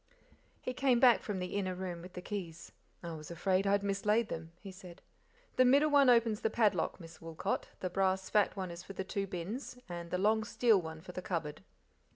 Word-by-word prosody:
He 255 - -3
came 255 -2 +3
back 245 -2 +6
froth 205 -3 -4
the 180 +1 -4
inner 185 -2 -1
room 180 -2 -5
with 180 +1 -11
the 180 - -7
keys. 180 -6 -6 0.3
"I 170 - -5
was 155 -1 -8
afraid 185 +3 +1
I - - +3
had 200 0 +2
mislaid 210 +3 +1
then," 165 0 -6
he 195 - -9
said; 185 -1 -12 0.6
"the 255 - +7
middle 280 +4 +5
one 280 -2 +6
opens 230 -3 +4
the 220 - +1
padlock, 215 -3 +1
Miss 165 -2 -12
Woolcot; 165 -1 -3
the 185 - -1
brass 190 0 +1
fat 210 -3 +2
one 185 -3 -4
is 170 0 -8
for 195 - -10
the 190 - -3
two 195 +1 -3
bins, 195 +9 -5
and 170 -1 -6
the 180 - -1
long 215 +3 +2
steel 215 -1 +3
one 160 -1 -8
for 180 - -9
the 185 - -5
cupboard." 160 - -3
190 Hz, 215 wpm, -33 LUFS, 175-215 Hz, 0.6 s, the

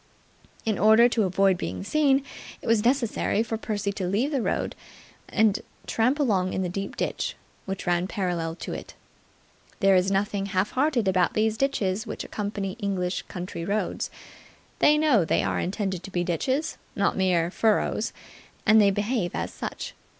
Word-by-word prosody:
In 215 -3 0
order 220 +4 +7
to 230 -3 +1
avoid 190 0 +2
being - - -4
seen, 275 +3 +3 0.4
it - - -13
was 225 -2 +3
necessary 235 -3 +1
for 225 0 -3
Percy 210 -2 -2
to 195 -2 -3
leave 225 +10 +1
the 275 -4 0
road - - -1 0.5
and 220 -2 +3 0.3
tramp 250 +5 +1
along 195 -9 +1
in 190 - -1
the 180 - -2
deep 195 +2 -4
ditch - - -2 0.3
which 195 0 -4
ran 175 +1 +1
parallel 175 -6 -2
to - - -6
it. - - -8 0.8
There 195 -2 +5
is 185 +1 +3
nothing 195 0 0
half 190 +1 0
hearted 260 -5 +1
about 185 -2 +2
these 220 0 +2
ditches 220 -5 0
which - - -5
accompany 200 -1 -4
English 195 -3 -1
country 180 -2 -6
roads. 205 +4 -1 0.7
They 300 0 +5
know 295 - +4
they - - +1
are - - 0
intended 190 -1 -2
to 195 - -9
be 175 -2 -1
ditches, 260 - -1 0.2
not 200 - +1
mere 175 -3 +2
furrows, 220 +1 +1 0.5
and 215 0 +7
they 200 - +5
behave 205 -2 -1
as - - -3
such. - - -5
200 Hz, 165 wpm, -26 LUFS, 185-225 Hz, 0.8 s, order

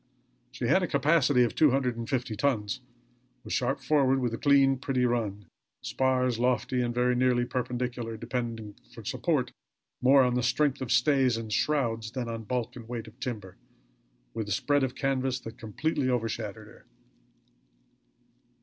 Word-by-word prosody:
She 120 0 -4
had 190 +11 +4
a 180 - 0
capacity 140 -3 +3
of 120 - 0
two 155 - +5
hundred 130 -2 0
and 115 -1 -6
fifty 125 -4 -1
tons; 115 -1 -1 0.6
was - - -5
sharp 130 +2 0
forward; 135 -3 +2
with 125 -3 -1
a - - -2
clean, 135 -2 +4
pretty 130 -2 0
run; 110 -5 -1 0.4
spars 130 -2 +1
lofty 125 0 +1
and 120 -1 0
very 125 +1 +1
nearly 125 -1 +2
perpendicular, 125 -2 -3
depending 115 -2 -4 0.2
for - - -10
support - - 0 0.5
more 135 +1 +6
on 125 -1 +1
the 125 - +1
strength 135 +3 +1
of 130 - -3
stays 135 -5 +3
and 110 -2 -5
shrouds 115 -7 0
than 125 -3 -3
on 115 -1 -5
bulk 125 0 -2
and 115 -2 -10
weight 120 -2 -4
of 110 - -15
timber, 105 -7 -5 0.8
with 110 -2 -4
a - - -5
spread 145 +7 +2
of 130 -1 -2
canvas 130 -2 0
that 115 0 -10
completely 130 +5 -1
overshadowed 115 -4 -2
her. - - -17
125 Hz, 165 wpm, -28 LUFS, 115-135 Hz, 0.8 s, more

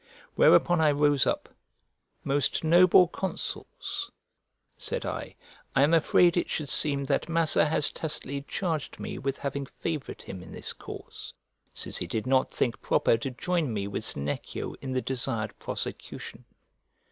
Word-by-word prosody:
Whereupon 175 -2 +5
I 155 - +5
rose 145 -1 +3
up; - - 0 0.8
"Most 140 -2 +1
noble 175 +2 +7
consuls," 190 +1 -4 0.7
said - - -3
I, - - -4 0.4
"I 135 - +6
am 150 +3 +4
afraid 170 +2 +5
it 175 - 0
should 150 -3 -2
seem 140 -2 +1
that 145 - 0
Massa 165 -2 +3
has 150 -1 +2
tacitly 140 -3 -4
charged 165 -6 -2
me - - -5
with 135 0 -2
having 140 0 -3
favoured 155 -1 -5
him 95 - -7
in - - -11
this - - -5
cause, - - -9 0.4
since - - -2
he 90 - -1
did 110 +5 -2
not 130 0 +3
think 120 - -1
proper - - +3
to 125 +4 -3
join 160 +2 -1
me 100 -2 -2
with 100 - -4
Senecio 70 +1 -4
in 135 - -4
the 130 - 0
desired 115 -4 -2
prosecution." - - -6
140 Hz, 150 wpm, -28 LUFS, 130-160 Hz, 0.8 s, noble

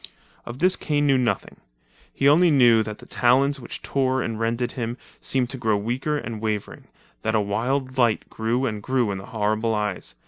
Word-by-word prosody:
Of 120 +1 -6
this 185 +5 +3
Kane 145 -2 0
knew 135 -2 +4
nothing; 125 -2 -1 0.5
he 140 - +1
only 170 +5 +6
knew 120 -6 +5
that 105 -1 -5
the - - -14
talons 135 +3 +2
which - - -8
tore 130 -2 0
and 110 -1 -4
rended 115 +2 -1
him 120 -1 -4 0.2
seemed 130 -1 -1
to 130 - -6
grow 110 -3 +1
weaker 125 +8 -2
and 115 -5 -6
wavering, 105 -2 -4 0.3
that 110 0 0
a - - +4
wild 130 +6 -1
light 115 -3 +2
grew 115 +4 -1
and 105 -4 -3
grew 125 -3 0
in 95 - -4
the 100 - -10
horrible 110 +1 0
eyes. 100 - -3
120 Hz, 195 wpm, -24 LUFS, 110-130 Hz, 0.5 s, only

